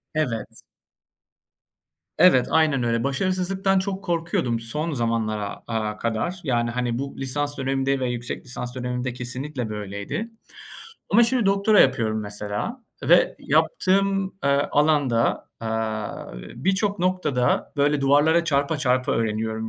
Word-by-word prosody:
Evet. 115 -9 -3 1.5
Evet, 130 -9 +6
aynen 155 -5 +3
öyle. 115 0 0
Başarısızlıktan 185 +6 0
çok 195 0 -3
korkuyordum 165 -9 -1
son 150 +9 -3
zamanlara, 115 -5 -2
aaa, 110 -2 -2
kadar. 115 +11 -2
Yani, 120 -4 0
hani, 120 0 -2
bu 140 0 -5
lisans 145 +2 -2
dönemimde 135 0 0
ve 125 -1 -1
yüksek 120 +1 -5
lisans 125 0 -6
dönemimde 125 0 -3
kesinlikle 125 +1 -4
böyleydi. 105 - -5 0.8
Ama 225 +4 +6
şimdi 235 -2 +1
doktora 200 +2 +4
yapıyorum 110 -4 +2
mesela 105 - -4 0.2
ve - - +4
yaptığım, 195 - +2 0.2
eee, 140 - +3 0.2
alanda, 145 -6 +2
aaa, 110 -1 -3 0.2
birçok 200 +2 0
noktada 175 -9 0
böyle 145 0 +2
duvarlara 145 +5 +4
çarpa 145 0 +1
çarpa 130 -2 +1
öğreniyorum, 110 0 -1
135 Hz, 120 wpm, -24 LUFS, 115-170 Hz, 1.5 s, Evet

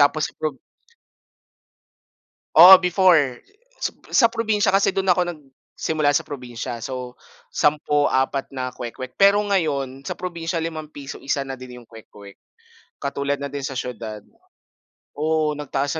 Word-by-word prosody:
Tapos 145 +2 +2
pag 155 -3 -2 2.0
Oo 180 +3 +11
before, 175 -8 +3 0.4
sap - - -5
sa 230 -3 +5
probinsya 215 -4 +1
kasi 195 0 +2
do'n 190 -1 +1
ako 180 0 +3
nagsimula 150 -1 -3
sa - - +2
probinsya, 120 -4 -6
so, 125 +1 -7 0.3
10/4 145 -2 +1
na 130 -1 -3
kwek-wek. 125 +2 -8
Pero 200 +1 +5
ngayon 140 -9 -1
sa - - -3
probinsiya 170 -2 -4
₱5 155 -3 -7
isa 140 0 -2
na 135 -1 -7
din 125 -1 -11
'yong 115 - -23
kwek-kwek, 105 -3 -14 0.6
katulad 140 0 -2
na 140 - -4
din 140 0 -4
sa 135 - -5
siyudad. 115 -4 -6 0.9
Oo, 155 0 0
nagtaas 145 -1 -2
145 Hz, 130 wpm, -22 LUFS, 130-165 Hz, 2.0 s, Oo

